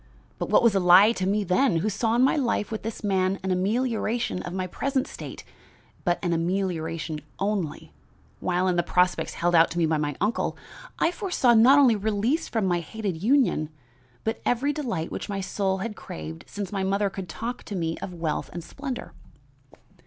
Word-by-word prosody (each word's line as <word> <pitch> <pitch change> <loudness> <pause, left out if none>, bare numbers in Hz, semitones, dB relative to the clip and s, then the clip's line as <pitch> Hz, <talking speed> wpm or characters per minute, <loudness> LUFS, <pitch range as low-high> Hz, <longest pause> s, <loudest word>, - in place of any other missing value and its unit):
but - - -3
what - - +5
was 235 -3 +5
a 195 - +3
lie 185 +4 +7
to 185 -5 -2
me 205 +2 +1
then, 195 +4 +2
who 165 +6 0
saw 220 +2 0
in 245 - +4
my 265 - +4
life 235 -7 0
with 220 - -3
this 225 0 -6
man 190 -1 +1
an 190 - -1
amelioration 225 +2 0
of 175 - -6
my 185 0 -2
present 265 +8 -1
state, - - -8 0.6
but 175 -1 +2
an 175 -2 +1
amelioration 165 -3 -2 0.2
only, 195 -6 -2 0.5
while 180 +1 0
in 180 -1 +1
the - - +4
prospects 180 +1 +1
held 175 +1 0
out 165 -1 +6
to 170 - -6
me 170 - +3
by 160 -1 +1
my 145 -1 -2
uncle 210 +4 0 0.4
I 335 - +2
foresaw 355 - +2
not 240 +5 +7
only 260 -6 +6
release 220 - 0
from 205 -5 0
a 175 - +2
hated 185 0 -4
union, 230 - +2 0.5
but 225 +1 -2
every 260 +4 +1
delight 230 - -3
which - - -5
my 200 -1 -2
soul 190 0 -1
had 220 -2 -5
craved 80 - -8
since 200 -3 -5
my 195 -2 -2
mother 200 +1 +1
could 190 -3 -7
talk 235 +8 -5
to 205 - -5
me 165 -2 -1
of - - -6
wealth 165 -3 -3
and 175 - -6
splendor. 270 - -6
195 Hz, 195 wpm, -26 LUFS, 175-230 Hz, 0.6 s, lie